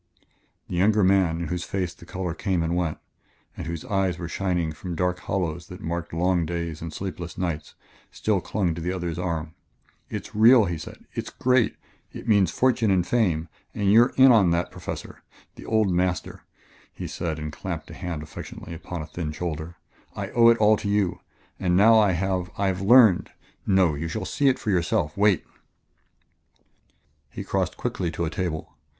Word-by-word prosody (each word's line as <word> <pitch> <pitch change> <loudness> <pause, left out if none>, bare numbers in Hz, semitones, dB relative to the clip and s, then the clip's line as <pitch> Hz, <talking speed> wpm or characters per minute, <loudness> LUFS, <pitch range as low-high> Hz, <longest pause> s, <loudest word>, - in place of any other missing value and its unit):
The 90 - -4
younger 105 +3 +4
man, 90 -3 +3
in 85 - -3
whose 90 +1 -2
face 90 -3 -3
the 85 - -16
color 90 -3 -3
came 90 -2 -1
and 85 +1 -1
went, 85 -3 -1 0.6
and - - -6
whose 85 -2 -5
eyes 95 -3 0
were 85 - -5
shining 90 -3 -1
from 85 +3 -6
dark 90 +1 0
hollows 85 -3 -3
that 90 - -10
marked 85 0 -4
long 90 +1 +1
days 85 -1 -4
and 80 0 -5
sleepless 90 -1 -6
nights, 85 -4 -3 0.3
still 105 -4 0
clung 90 -4 -1
to 85 - -6
the 90 +2 -2
other's 85 -2 -3
arm. 80 -3 -3 0.6
"It's - - -6
real," 115 +1 +7
he 85 -3 -3
said; - - -10
"it's - - -4
great! 125 -2 +2 0.4
It - - -9
means 100 -4 +4
fortune 120 -4 +2
and 90 -3 +2
fame, 90 -9 +1 0.3
and 100 -1 +2
you're 120 +3 +6
in 130 0 +8
on 105 -7 +5
that, 85 +1 0
Professor. - - -7 0.3
The - - -12
old 110 -3 +2
master," 90 -1 -1 0.5
he - - -7
said 80 -3 -3
and 75 -1 -5
clapped - - -6
a - - -8
hand 85 -4 -5
affectionately 80 +2 -9
upon 85 0 -6
a - - -6
thin 75 0 -5
shoulder; 80 +1 -5 0.4
"I - - -5
owe 115 -1 +5
it 115 0 +6
all 110 0 +5
to 100 - -4
you. 100 -3 +1 0.4
And 90 -1 +2
now 110 +3 +7
I 100 -3 +4
have 90 0 -1
I 100 - 0
have 95 0 -2
learned.... 110 -2 +6 0.4
No, 95 -5 +4
you 75 +3 -3
shall 80 - -4
see 140 -2 +2
for 110 - -3
yourself. 85 -4 0
Wait 100 -2 +3 1.0
" 70 0 -42
He - - -4
crossed - - -1
quickly 90 - -2
to 85 +1 -2
a 80 - -3
table. 80 -5 -4
90 Hz, 185 wpm, -25 LUFS, 85-100 Hz, 1.0 s, in